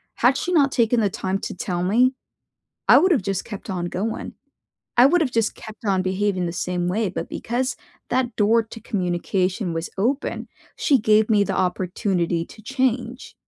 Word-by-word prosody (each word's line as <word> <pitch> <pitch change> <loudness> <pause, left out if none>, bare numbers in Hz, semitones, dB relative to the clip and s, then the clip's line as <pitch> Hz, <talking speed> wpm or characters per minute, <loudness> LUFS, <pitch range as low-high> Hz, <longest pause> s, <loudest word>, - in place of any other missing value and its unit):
Had 255 +3 +3
she 360 - -2
not 280 -5 +4
taken 235 -1 +2
the 205 - +2
time 190 +1 -2
to - - -5
tell 175 -1 -3
me, 240 +8 +3 0.8
I - - +9
would've 350 - +3
just 195 0 -2
kept 205 -1 -8
on 180 -2 -2
going 200 +6 -4 0.6
I 245 +2 +8
would've 310 -4 +2
just 225 -2 0
kept 220 0 -11
on 190 -2 +1
behaving 190 0 0
the 170 - -3
same 180 0 -2
way. 210 +2 0
But 180 - -4
because 250 +3 -2 0.3
that 250 -2 0
door 225 +2 +4
to 225 +1 -11
communication 185 -1 -1
was 165 0 -3
open, 255 +8 -1 0.3
she 280 - +3
gave 215 +1 +3
me 210 -2 +4
the 195 -1 -2
opportunity 180 -2 0
to 215 - -15
change. 255 0 -2
210 Hz, 175 wpm, -23 LUFS, 185-245 Hz, 0.8 s, I